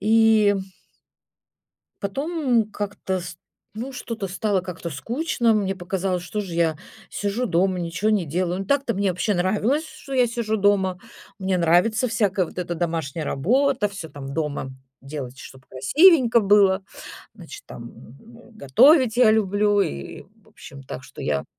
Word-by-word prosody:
И 220 0 +4 1.5
потом 255 - -1
как-то 195 -2 -3
ст 170 -1 -9 0.4
ну, 265 +4 -5
что-то 230 -5 -5
стало 195 +1 -1
как-то 175 -2 -6
скучно. 235 - -1
Мне 200 -3 0
показалось, 185 0 -2
что 210 +4 -4
же 190 -5 -6
я 165 -2 +1 0.3
сижу 205 +4 -2
дома, 185 -2 +1
ничего 175 +5 -2
не 205 -4 +1
делаю. 175 +4 -2
Ну, - - -4
так-то 275 +1 0
мне 200 0 +1
вообще 185 +4 -1
нравилось, 210 - +1
что 275 -3 -9
я 250 -2 +4
сижу 225 -2 -2
дома. 195 -2 +2 0.4
Мне 190 -1 0
нравится 180 +9 +2
всякая 200 -5 +1
вот - - -14
эта 175 -1 -3
домашняя 165 -3 -3
работа, 245 - +1
всё 190 -5 -8
там 140 -2 -8
дома 145 -3 -3 0.3
делать, 135 -2 -7
чтобы 135 -1 -13
красивенько 245 - +4
было. 200 -2 +4 0.5
Значит, - - -11
там, - - -10
м, 225 - -14
м, 230 -2 -20
готовить 250 - +5
я 240 -3 +5
люблю 205 -1 +2
и, 70 - -3 0.2
в - - -23
общем, 135 0 -12
так 130 0 -8
что - - -11
я 70 -2 -1
195 Hz, 155 wpm, -23 LUFS, 170-225 Hz, 1.5 s, готовить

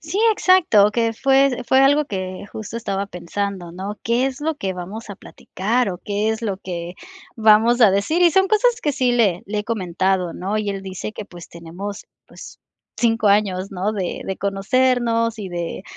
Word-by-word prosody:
Sí, 320 +6 -4
exacto, 365 - +4
o - - 0
que 230 0 0
fue 270 +1 +2
fue 265 - +4
algo 285 +2 +4
que 185 -4 -5
justo 220 +1 -6
estaba 200 -3 -3
pensando, 180 0 -5
¿no?, 195 +4 -6
¿qué 235 +3 +1
es 270 +1 -5
lo 320 +1 0
que 190 -9 -4
vamos 205 +6 -7
a 200 - -6
platicar 220 +4 -2
o 180 - -6
qué 205 +3 -2
es 220 +1 -2
lo 200 -4 -2
que 175 -2 -6 0.4
vamos 225 +2 +4
a 215 -4 +7
decir?, 200 - 0
y 345 -1 +6
son 385 +3 +3
cosas 460 +3 +2
que 295 - +1
sí, 255 -2 +1
le 205 -8 +2
le 210 +1 -3
he 210 - -9
comentado, 185 -4 -1
¿no?, 200 +4 -2
y 210 -1 -2
él 195 -1 -3
dice 190 +2 -6
que, 215 - -7
pues, 175 -3 -12
tenemos, 180 +5 -8 0.2
pues, - - -13 0.4
5 225 -2 +2
años, 195 -2 +1
¿no?, 195 +3 -2
de 190 -4 -3
de 190 - -3
conocernos 230 +3 +1
y 200 -3 -5
de 175 0 -5
210 Hz, 195 wpm, -21 LUFS, 190-240 Hz, 0.4 s, a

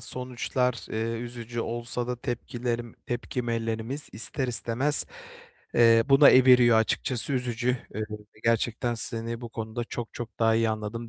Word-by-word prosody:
sonuçlar, 125 0 -2
eee, 115 +1 -2
üzücü 120 -1 -5
olsa 120 +1 -3
da 125 - -3
tepkilerim, 120 -2 -4
tepkilerimiz 120 +1 -3
ister 130 +4 -2
istemez, 120 +6 +1 0.7
eee, 115 -1 +6
buna 135 +1 +8
eviriyor, 125 -3 +6
açıkçası 120 +3 0
üzücü. 125 -2 -1 0.3
Eee, 105 - -3
ve 105 0 -11
gerçekten 115 +1 +1
seni 115 0 +2
bu 120 - -7
konuda 110 +1 -5
çok 120 -1 -6
çok 120 -2 -7
daha 115 -1 +3
iyi 115 0 +2
anladım 110 +2 -4
120 Hz, 135 wpm, -27 LUFS, 115-125 Hz, 0.7 s, buna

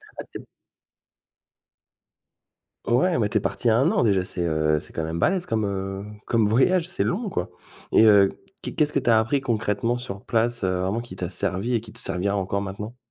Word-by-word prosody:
Ah - - -6
tu - - -7
es - - -14 2.4
Ouais 140 +9 +2
mais 105 - +2
tu 110 - 0
es - - +3
parti 100 +5 0
1 125 +9 +3
an - - +2
déjà 100 -4 +2
c'est, 90 -1 -3
heu, 75 -1 +1
c'est - - -13
quand 80 - -3
même 80 +1 -3
balèze 180 - +1
comme, 110 -2 -1
heu, 95 0 -4 0.2
comme 115 -2 +2
voyage! 165 - +3
C'est 185 - -1
long 210 +5 -1
quoi 90 - -3 0.4
et 110 - +6
heu, 100 -2 +6 0.3
qu'est - - -6
qu'est-ce 150 -2 +1
que 140 - +2
tu 120 - -1
as 110 -1 +6
appris 135 +5 0
concrètement 115 -1 -1
sur 100 -5 -6
place, 115 -1 0
heu, 90 0 0
vraiment 105 +5 -1
qui 120 -6 -10
t'a 90 - -3
servi 100 +6 -1
et 115 - +1
qui 105 -2 -11
te - - -6
servira 100 +3 0
encore 100 +1 -1
maintenant? 105 +5 -6
110 Hz, 210 wpm, -24 LUFS, 95-120 Hz, 2.4 s, et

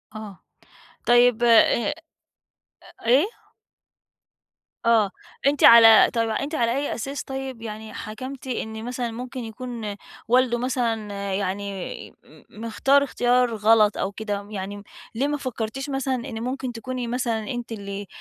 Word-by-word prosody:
آه. 210 -3 -9 0.6
طيب، 240 -1 +5
آآ، 240 - +5 0.4
آآ، - - -1 1.1
إيه؟ 260 +8 +5 1.6
آه، 220 -4 +4 0.4
أنتِ 285 0 +1
على 225 -1 +9
طيب، 230 -1 0
أنتِ 280 +7 -2
على 235 -4 +1
أي 285 - -2
أساس 275 +4 -5
طيب، 265 -3 -6
يعني 220 -1 -7
حكمتِ 255 +6 -7
إن 220 -2 -4
مثلًا 245 -1 -3
ممكن 250 +3 -7
يكون 225 -2 -6 0.3
والده 250 0 +3
مثلًا 235 -4 -1 0.2
يعني 195 0 -4
م - - -19 0.2
مختار 270 +5 +3
اختيار 245 -3 +1
غلط 215 0 +4
أو 195 - -2
كده؟ 205 -1 -4
يعني 200 0 -6 0.3
ليه 270 +5 +1
ما 295 - -1
فكرتيش 255 0 -4
مثلًا 270 -1 -1
إن 235 -2 -6
ممكن 255 0 -3
تكوني 250 +1 -5
مثلًا 230 -3 -2
أنتِ 240 -2 -5
اللي 200 -2 -6
235 Hz, 130 wpm, -24 LUFS, 215-255 Hz, 1.6 s, على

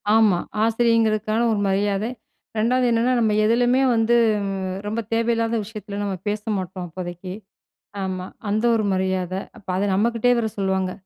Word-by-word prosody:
ஆமா, 210 -6 +4 0.2
ஆசிரியங்கிறதுக்கான 225 -1 +2
ஒரு 210 - 0
மரியாதை. 200 +3 0 0.5
2வது 250 +3 +2
என்னன்னா, 235 +2 +2
நம்ம 220 -2 +2
எதுலயுமே 245 +3 +3
வந்து 225 +1 +3 0.7
ரொம்ப 220 +2 -2
தேவையில்லாத 230 0 +1
விஷயத்தில 205 -1 -7
நம்ம 195 -2 -2
பேச 210 0 -1 0.2
மாட்டோம் 185 -1 -5
அப்போதைக்கு. 175 +1 -7 0.7
ஆமா. 185 -1 -3 0.2
அந்த 215 +3 0
ஒரு 215 - +1
மரியாத 185 -1 -1 0.2
அப்ப 195 - -18
அத 195 - 0
நம்மகிட்டயே 235 +4 +2
வர 220 - 0
சொல்லுவாங்க. 190 -1 0
215 Hz, 135 wpm, -22 LUFS, 190-230 Hz, 0.7 s, ஆமா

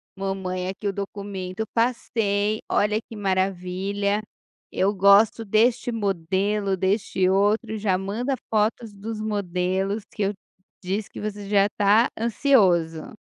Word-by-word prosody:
mamãe 190 -2 -3
aqui 200 +2 -5
o 195 - -1
documento, 200 -1 -5
eu 220 - -2
passei, 215 -3 0
olha 210 +1 +2
que 225 - -12
maravilha, 195 +1 -1 0.5
eu 195 +2 +1
gosto 200 +3 +5
deste 230 +4 +2
modelo, 195 -1 0
deste 190 -1 +1
outro 205 +4 +2
e - - -3
já 200 -3 +1
manda 220 +8 -2
fotos 220 +1 0
dos 215 +2 -6
modelos 195 -1 -1
que 210 - -2
eu 200 +1 0 0.5
disse 200 +4 -2
que - - -9
você 205 -1 -5
já 200 -1 +4
tá 210 +4 +4
ansioso.", 190 - +2
200 Hz, 130 wpm, -24 LUFS, 190-215 Hz, 0.5 s, gosto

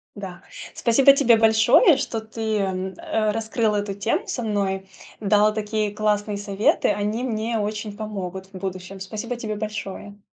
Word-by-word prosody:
Да. 195 -4 -8 0.3
Спасибо 270 +4 +5
тебе 245 -5 +5
большое, 225 - +6
что 260 -4 -3
ты, 220 0 -3
м, 190 -1 -2
э, 310 -11 0
раскрыл 220 0 0
эту 205 -1 -2
тему 200 +4 -1
со 245 - -3
мной, 195 -3 -1 0.3
дал 210 0 +3
такие 215 0 -1
классные 210 0 0
советы, 200 +1 +1
они 210 +4 -1
мне 225 -1 -1
очень 210 0 -3
помогут 190 -3 -5
в 190 - -8
будущем. 185 0 -6
Спасибо 215 +5 -5
тебе 220 -3 -4
большое! 205 -1 -6
215 Hz, 150 wpm, -23 LUFS, 200-225 Hz, 0.3 s, большое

